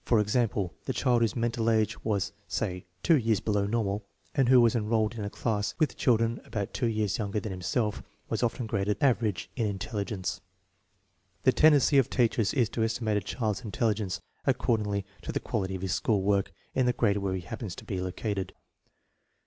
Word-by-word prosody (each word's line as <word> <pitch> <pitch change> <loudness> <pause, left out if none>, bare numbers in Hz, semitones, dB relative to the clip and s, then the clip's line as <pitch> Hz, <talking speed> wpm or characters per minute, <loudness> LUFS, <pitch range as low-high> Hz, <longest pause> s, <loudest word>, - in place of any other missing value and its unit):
For 115 - +3
example, 105 -4 +1
the - - -1
child 125 -3 +2
whose 115 -3 +1
mental 115 -1 0
age 110 -1 +1
was, 105 -4 -1
say, 90 0 -3 0.2
two 165 - +5
years 110 -4 +2
below 105 -2 0
normal, 105 -2 -1 0.3
and 135 -5 +2
who 130 -1 +8
was 120 0 +4
enrolled 110 -1 +1
in 110 -3 -5
a 100 - -3
class 105 -2 -1
with 155 -5 +1
children 115 -1 +2
about 100 -3 -4
two 125 - 0
years 110 -2 0
younger 105 0 -1
than 105 -1 -5
himself, 105 +4 -1 0.3
was - - -2
often 120 0 0
graded 105 -1 0
" - - -33
average 110 -7 -1
" - - -37
in 115 -4 0
intelligence. 100 -1 -3 1.0
The 130 - +6
tendency 145 -1 +5
of 130 - +2
teachers 115 -4 +2
is 125 -5 +3
to 115 - -1
estimate 110 -1 0
a - - 0
child's 105 +1 -2
intelli 110 0 0
gence 100 -4 -3 0.2
according 105 -3 +1 0.2
to - - -5
the - - -1
quality 95 -2 -2
of 95 - -6
his 95 -1 0
school 100 -2 +1
work 100 -1 +1 0.2
in 130 -1 +2
the 125 - +3
grade 105 -4 +2
where 100 -2 -1
he 95 - -3
happens 90 +2 -6
to - - -10
be 95 -2 -3
located. 95 +2 -3
110 Hz, 195 wpm, -29 LUFS, 100-115 Hz, 1.0 s, who